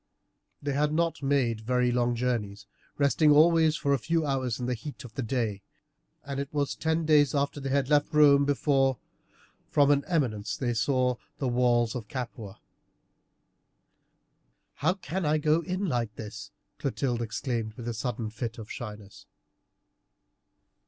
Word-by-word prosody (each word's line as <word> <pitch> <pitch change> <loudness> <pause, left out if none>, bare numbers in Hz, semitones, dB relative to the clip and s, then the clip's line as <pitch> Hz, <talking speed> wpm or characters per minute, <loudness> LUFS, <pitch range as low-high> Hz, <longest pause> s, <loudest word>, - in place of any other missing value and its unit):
They 145 -1 -1
had 150 +2 +1
not 165 0 0
made 135 -5 +1
very 125 +2 +1
long 120 0 +1
journeys, 110 -5 -2 0.3
resting 145 +2 +3
always 160 +1 +5
for 140 -4 0
a 140 - +1
few 165 +5 0
hours 130 -5 -1
in 125 - -3
the 125 - 0
heat 140 +6 -8
of 120 -3 -11
the 135 - -3
day, 115 -4 -2 0.6
and 140 -1 -4
it 140 0 -4
was 145 -2 -1
ten 160 0 0
days 150 -2 +4
after 140 +1 0
they 135 -1 -4
had 135 -1 +1
left 145 +1 +2
Rome 145 -2 +6
before, 135 -2 +2 0.7
from 145 0 +4
an 140 -1 +3
eminence, 125 - -1
they 120 -3 -1
saw 125 +1 +1 0.2
the 135 - -2
walls 120 -2 +2
of 120 -4 -6
Capua. 115 -5 -6 2.1
"How 180 - 0
can 190 0 -4
I 155 0 +2
go 155 +2 +2
in 185 +3 -3
like 120 - -2
this?" 105 -2 -8 0.3
Clotilde 130 -3 -1
exclaimed 115 -1 -3
in 120 -2 -7
a 120 - -2
sudden 115 -1 -3
fit 115 +1 -5
of 110 -2 -9
shyness. 105 -3 -9
130 Hz, 155 wpm, -28 LUFS, 120-145 Hz, 2.1 s, Rome